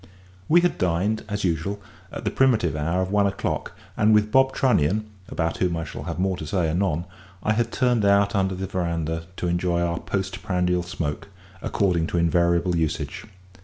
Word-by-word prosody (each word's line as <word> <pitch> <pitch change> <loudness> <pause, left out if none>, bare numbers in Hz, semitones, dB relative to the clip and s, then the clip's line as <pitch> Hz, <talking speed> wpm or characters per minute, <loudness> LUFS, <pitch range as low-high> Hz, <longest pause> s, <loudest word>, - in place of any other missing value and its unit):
We 175 +2 +6
had 175 - 0
dined, 90 +5 0
as 105 0 -2
usual, 90 +3 -1 0.3
at - - -7
the - - +1
primitive 110 -12 +2
hour 85 +5 0
of 95 - -4
one 100 -1 +3
o'clock; 100 - -3 0.2
and 110 0 +4
with 105 0 +2
Bob 130 0 +5
Trunnion 110 - +2 0.2
about 80 -1 -1
whom 90 -2 0
I 80 - -2
shall 75 -1 -7
have 85 -2 -4
more 95 +1 +1
to 80 - -6
say 85 -2 0
anon 85 -2 0 0.4
I 110 - +2
had 115 +1 0
turned 125 -4 +2
out 100 0 +4
under 95 -2 +1
the 95 +1 -4
verandah 85 -3 -2
to 90 - -2
enjoy 85 0 0
our 85 -1 0
post 95 0 -3
prandial 90 -2 +1
smoke, 85 -4 -4 0.3
according 90 -5 +1
to 90 - -2
invariable 85 +1 +2
usage. 80 -3 -2
90 Hz, 185 wpm, -24 LUFS, 85-100 Hz, 0.4 s, We